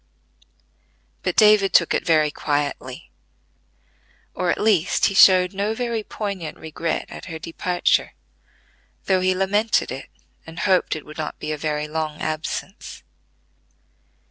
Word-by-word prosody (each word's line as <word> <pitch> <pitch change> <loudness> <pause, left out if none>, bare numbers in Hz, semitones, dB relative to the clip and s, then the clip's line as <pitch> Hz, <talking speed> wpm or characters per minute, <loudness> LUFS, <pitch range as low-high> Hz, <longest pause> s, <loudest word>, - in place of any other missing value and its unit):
But - - -2
David 210 -3 +5
took 170 - +4
it - - 0
very 155 -2 +3
quietly; 145 -4 -3 1.2
at 180 -1 0
least, 200 -5 +2
he - - +1
showed 185 -1 +6
no 205 +3 -1
very 235 -2 -2
poignant 200 -7 -5
regret 160 +1 -3
at - - -9
her 165 -3 -6
departure, 175 +2 0 0.9
though 190 -1 +2
he 185 0 +2
lamented 205 +4 +1
it, - - -7 0.4
and 165 0 -7
hoped 185 -4 +2
it 155 - -8
would 150 +1 -11
not 155 - -4
be 155 - -5
a - - -1
very 150 0 -2
long 155 -1 -4
absence. 155 +5 -5
175 Hz, 130 wpm, -22 LUFS, 155-195 Hz, 1.2 s, showed